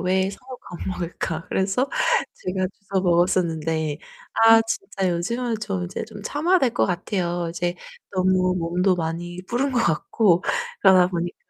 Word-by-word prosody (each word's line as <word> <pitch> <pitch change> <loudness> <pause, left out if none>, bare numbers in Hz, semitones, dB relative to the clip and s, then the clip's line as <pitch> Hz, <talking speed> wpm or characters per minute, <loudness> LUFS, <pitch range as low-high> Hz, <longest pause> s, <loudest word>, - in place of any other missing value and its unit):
왜 190 +1 +1
사 200 - -10
놓고 255 -1 -9 0.2
안 - - -5
먹을까?' 170 -3 -4
그래서 195 +8 0 0.5
제가 185 0 -2 0.2
주워 190 -2 +1
먹었었는데. 165 -4 +1 0.4
아 225 0 +8
진짜 225 - -2
요즘은 235 +8 -1
좀 195 -4 -2
이제 180 - -5
좀 205 - -11
참아야 320 - +2
될 260 -7 +2
것 - - +2
같아요. 175 -1 -2
이제 175 +1 -2 0.4
너무 185 -1 +2
몸도 180 +3 +1
많이 175 +1 -4
불은 260 +5 0
것 245 - +1
같고 175 +2 +2 0.4
그러다 185 -2 +6
보니까 175 -1 -3
185 Hz, 300 characters per minute, -23 LUFS, 175-205 Hz, 0.5 s, 아